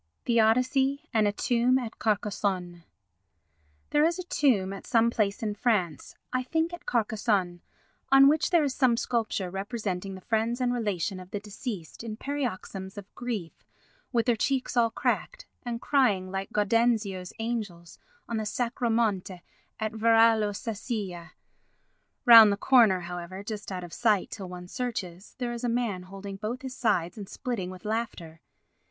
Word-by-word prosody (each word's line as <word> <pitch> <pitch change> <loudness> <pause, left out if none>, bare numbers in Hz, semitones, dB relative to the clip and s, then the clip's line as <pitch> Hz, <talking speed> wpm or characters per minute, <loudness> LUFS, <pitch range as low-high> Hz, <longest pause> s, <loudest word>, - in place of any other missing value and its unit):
The 235 -1 +3
Odyssey 265 +6 +2
and 215 -2 +3
a - - +2
Tomb 240 +4 +2
at 240 -4 -5
Carcassonne 195 -5 -1 1.1
There 295 - +4
is 335 +2 +2
a 365 - -4
tomb 235 - +1
at 195 - -9
some 230 -1 +3
place 210 -2 0
in 210 -1 -1
France, 200 - -1 0.2
I 255 - +1
think 325 +6 -1
at 345 - -9
Carcassonne, 210 -6 0 0.5
on 270 0 +8
which 305 +2 +3
there 340 -3 +4
is 280 -3 0
some 255 -4 +3
sculpture 220 -7 -1
representing 195 -2 -4
the 190 - -10
friends 225 +4 0
and 250 -1 +1
relations 200 -4 -2
of 180 - -12
the 205 - -4
deceased 205 - -7
in 220 -2 -6
paroxysms 215 -8 -4
of 200 -1 -10
grief 220 -9 -5 0.5
with 235 -3 +1
their 240 -2 +3
cheeks 255 +3 -1
all 235 -1 +4
cracked, - - -2 0.2
and 240 -2 -4
crying 205 -10 +2
like 195 0 -4
Gaudenzio's 210 -3 +1
angels 215 -7 -5 0.3
on 230 - -2
the 215 - -2
Sacro 240 +1 -1
Monte 200 -6 0 0.4
at 220 -1 -1
Varallo 225 -1 +4
Sesia. 205 -5 -5 0.9
Round 225 -4 +10
the 200 - 0
corner, 220 -7 +5
however, 175 +2 -6
just 210 -1 -6
out 180 -1 -4
of 175 - -9
sight 220 -5 +1
till 195 -4 -7
one 180 0 -8
searches, 195 -6 -5
there 245 -2 -3
is 235 - -6
a 245 - +1
man 230 -6 -1
holding 195 +1 -8
both 235 +6 -4
his 260 -1 -6
sides 195 -5 0
and 200 - -8
splitting 220 -8 -4
with 185 +3 -11
laughter. 210 -8 -4
220 Hz, 160 wpm, -28 LUFS, 190-240 Hz, 1.1 s, Round